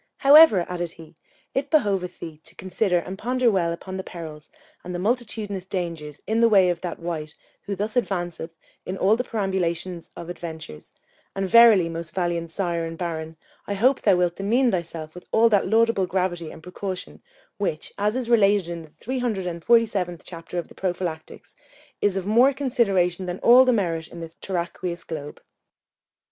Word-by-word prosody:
_ -, -, -41 dB
However, 280 Hz, -, +7 dB
added 175 Hz, -2 st, -4 dB
he, 165 Hz, -2 st, -14 dB, 0.4 s
it 280 Hz, +1 st, -1 dB
behoveth 195 Hz, -, +1 dB
thee 155 Hz, -2 st, -8 dB
to 160 Hz, -, -13 dB
consider 185 Hz, 0 st, 0 dB
and 185 Hz, +3 st, -5 dB
ponder 250 Hz, 0 st, +2 dB
well 175 Hz, -4 st, +1 dB
upon 185 Hz, +3 st, -6 dB
the 190 Hz, -, -4 dB
perils 155 Hz, -4 st, -9 dB, 0.3 s
and 180 Hz, 0 st, -6 dB
the -, -, -3 dB
multitudinous 215 Hz, -3 st, -2 dB
dangers 165 Hz, -6 st, -5 dB
in 220 Hz, +1 st, 0 dB
the 230 Hz, 0 st, +5 dB
way 190 Hz, -4 st, +5 dB
of 170 Hz, -, -5 dB
that 175 Hz, -2 st, -4 dB
wight 160 Hz, -3 st, -5 dB, 0.3 s
who 200 Hz, -, -2 dB
thus 210 Hz, +3 st, -3 dB
advanceth 175 Hz, -8 st, -2 dB, 0.3 s
in 185 Hz, -, -5 dB
all 200 Hz, +4 st, +4 dB
the 250 Hz, -, -2 dB
perambulation 185 Hz, -5 st, -2 dB
of 170 Hz, -, -8 dB
adventures: 160 Hz, -, -8 dB, 0.4 s
and 195 Hz, 0 st, -1 dB
verily, 225 Hz, -5 st, +7 dB
most 165 Hz, 0 st, -6 dB
valiant 170 Hz, -2 st, -1 dB
sire 170 Hz, -1 st, -2 dB
and 165 Hz, 0 st, -5 dB
Baron, 160 Hz, -2 st, -4 dB, 0.3 s
I 200 Hz, -, -2 dB
hope 255 Hz, +7 st, +3 dB
thou 200 Hz, -3 st, +4 dB
wilt 175 Hz, -1 st, 0 dB
demean 235 Hz, +6 st, +2 dB
thyself 165 Hz, -4 st, -4 dB
with 180 Hz, -, -12 dB
all 230 Hz, +1 st, +5 dB
that 205 Hz, -3 st, +2 dB
laudable 225 Hz, -4 st, +3 dB
gravity 175 Hz, -3 st, -1 dB
and 160 Hz, -, -12 dB
precaution 185 Hz, +1 st, -6 dB, 0.4 s
which, 155 Hz, -6 st, -3 dB
as 210 Hz, +2 st, +1 dB
is 255 Hz, -2 st, -2 dB
related 205 Hz, -6 st, +3 dB
in 170 Hz, -1 st, -5 dB
the 160 Hz, -, -14 dB
three 255 Hz, -, -5 dB
hundred 220 Hz, -7 st, -1 dB
and 170 Hz, -2 st, -5 dB
forty 235 Hz, -1 st, +5 dB
seventh 180 Hz, -5 st, -4 dB
chapter 170 Hz, 0 st, -7 dB
of 175 Hz, -, -3 dB
the -, -, -15 dB
Prophilactics, 175 Hz, -4 st, -5 dB, 0.5 s
is 200 Hz, -2 st, +2 dB
of 190 Hz, -, -3 dB
more 240 Hz, +7 st, +5 dB
consideration 195 Hz, -9 st, +1 dB
than 180 Hz, 0 st, -3 dB
all 250 Hz, +2 st, +8 dB
the 255 Hz, -, +4 dB
merit 170 Hz, -8 st, -1 dB
in 170 Hz, -, -11 dB
this 165 Hz, -1 st, -8 dB
terraqueous 175 Hz, -1 st, -4 dB
globe. 150 Hz, -3 st, -7 dB
185 Hz, 185 wpm, -24 LUFS, 170-210 Hz, 0.5 s, all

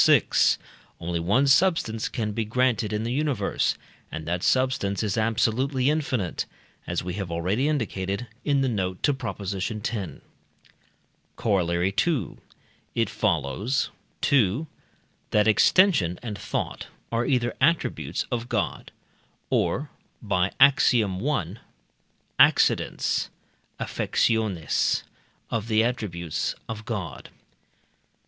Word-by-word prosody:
vi.) -, -, +7 dB, 0.8 s
only 85 Hz, 0 st, -2 dB
one 105 Hz, +12 st, +2 dB
substance 140 Hz, -, +2 dB
can 110 Hz, -4 st, -2 dB
be 115 Hz, +2 st, -1 dB
granted 115 Hz, -1 st, +1 dB
in 105 Hz, +1 st, -1 dB
the 120 Hz, +1 st, -2 dB
universe, 145 Hz, -1 st, 0 dB, 0.4 s
and 80 Hz, 0 st, -5 dB
that 90 Hz, +1 st, -1 dB
substance 130 Hz, -6 st, +1 dB
is 105 Hz, -3 st, -1 dB
absolutely 125 Hz, +5 st, +1 dB
infinite, 135 Hz, -, -1 dB, 0.4 s
as -, -, -2 dB
we 90 Hz, 0 st, -4 dB
have 95 Hz, -2 st, -4 dB
already 90 Hz, -, 0 dB
indicated 105 Hz, -7 st, -2 dB, 0.2 s
(in 140 Hz, -2 st, +2 dB
the 135 Hz, -, +2 dB
note 95 Hz, -6 st, -2 dB
to 145 Hz, -, +4 dB
Prop. 115 Hz, -7 st, -5 dB
x.). 100 Hz, -1 st, -3 dB, 1.8 s
Corollary 90 Hz, -3 st, +1 dB
II. 135 Hz, -, -1 dB, 0.6 s
It -, -, +1 dB
follows: 100 Hz, -, 0 dB, 0.3 s
2. 130 Hz, -, +2 dB, 0.6 s
That 105 Hz, 0 st, +3 dB
extension 110 Hz, -, +4 dB
and 110 Hz, -4 st, -4 dB
thought 95 Hz, -, -4 dB, 0.2 s
are 115 Hz, +1 st, 0 dB
either 120 Hz, -4 st, +1 dB
attributes 165 Hz, +5 st, +1 dB
of 120 Hz, -1 st, -2 dB
God -, -, -2 dB, 0.6 s
or 145 Hz, +3 st, 0 dB, 0.3 s
(by 95 Hz, -3 st, 0 dB
Ax. 140 Hz, -1 st, +6 dB
i.) 100 Hz, -, 0 dB, 0.8 s
accidents -, -, +3 dB, 0.5 s
(affectiones) 110 Hz, -8 st, 0 dB, 0.5 s
of 115 Hz, -1 st, -2 dB
the 110 Hz, -1 st, +3 dB
attributes 95 Hz, -10 st, -2 dB
of 110 Hz, -1 st, -6 dB
God. 110 Hz, -7 st, -5 dB
110 Hz, 110 wpm, -25 LUFS, 95-130 Hz, 1.8 s, vi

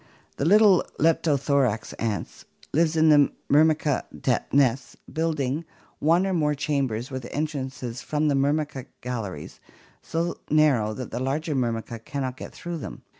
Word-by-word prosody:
The 140 Hz, -, -1 dB
little 200 Hz, 0 st, +6 dB
Leptothorax 140 Hz, -7 st, +1 dB
ants 105 Hz, -6 st, -3 dB, 0.3 s
live 165 Hz, +1 st, +2 dB
in 160 Hz, 0 st, +5 dB
the 145 Hz, -2 st, +6 dB, 0.2 s
Myrmica 155 Hz, -1 st, +3 dB, 0.5 s
nests, 135 Hz, -1 st, +2 dB, 0.2 s
building 155 Hz, -2 st, -1 dB, 0.4 s
one 170 Hz, +5 st, +3 dB
or 190 Hz, -, 0 dB
more 150 Hz, -4 st, +1 dB
chambers 135 Hz, -4 st, -1 dB
with 130 Hz, -2 st, -5 dB
entrances 135 Hz, -5 st, -4 dB
from 150 Hz, 0 st, 0 dB
the 145 Hz, -, +3 dB
Myrmica 140 Hz, -1 st, 0 dB
galleries, 105 Hz, -11 st, -5 dB, 0.4 s
so 170 Hz, +1 st, -2 dB
narrow 135 Hz, -9 st, +3 dB
that 130 Hz, -, -6 dB
the -, -, -3 dB
larger 150 Hz, +5 st, -1 dB
Myrmicas 115 Hz, -3 st, -2 dB
cannot 135 Hz, -2 st, -3 dB
get -, -, -8 dB
through 170 Hz, -1 st, -6 dB
them. -, -, -8 dB
140 Hz, 135 wpm, -25 LUFS, 125-155 Hz, 0.5 s, little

